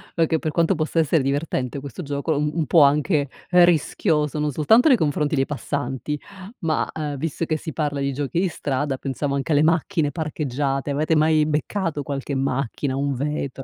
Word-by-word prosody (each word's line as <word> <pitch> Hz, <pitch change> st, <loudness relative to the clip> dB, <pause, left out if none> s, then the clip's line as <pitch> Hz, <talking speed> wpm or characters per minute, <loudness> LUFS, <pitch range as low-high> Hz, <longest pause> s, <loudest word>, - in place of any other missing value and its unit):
perché 165 Hz, -1 st, +2 dB
per 155 Hz, -, -2 dB
quanto 170 Hz, +4 st, +2 dB
possa 155 Hz, +1 st, -1 dB
essere 160 Hz, -1 st, +3 dB
divertente 140 Hz, -1 st, -2 dB
questo 140 Hz, +5 st, -7 dB
gioco 145 Hz, +2 st, -2 dB
un 150 Hz, 0 st, +1 dB
un 160 Hz, -2 st, 0 dB
po' 165 Hz, +1 st, +5 dB
anche 145 Hz, +1 st, +2 dB, 0.2 s
rischioso, 165 Hz, -3 st, +3 dB
non 150 Hz, 0 st, 0 dB
soltanto 190 Hz, -, +4 dB
nei 270 Hz, -, +7 dB
confronti 150 Hz, -2 st, 0 dB
dei 135 Hz, -1 st, +2 dB
passanti 140 Hz, 0 st, -3 dB, 0.4 s
ma, 160 Hz, -3 st, 0 dB
ehm, 150 Hz, -2 st, -4 dB
visto 160 Hz, +3 st, -3 dB
che 155 Hz, -1 st, -1 dB
si 160 Hz, 0 st, -7 dB
parla 145 Hz, -3 st, -2 dB
di 140 Hz, 0 st, -1 dB
giochi 145 Hz, +4 st, -2 dB
di 190 Hz, -, +2 dB
strada, 140 Hz, -2 st, -2 dB
pensavo 140 Hz, +1 st, -2 dB
anche 140 Hz, +4 st, -2 dB
alle 145 Hz, 0 st, +4 dB
macchine 160 Hz, -1 st, +1 dB
parcheggiate: 145 Hz, -3 st, -2 dB
avete 155 Hz, +3 st, +1 dB
mai 155 Hz, 0 st, +3 dB
beccato 155 Hz, +1 st, -1 dB
qualche 140 Hz, 0 st, -4 dB
macchina, 135 Hz, 0 st, -1 dB
un 140 Hz, +1 st, -1 dB
vetro? 140 Hz, 0 st, -3 dB
150 Hz, 180 wpm, -23 LUFS, 140-160 Hz, 0.4 s, nei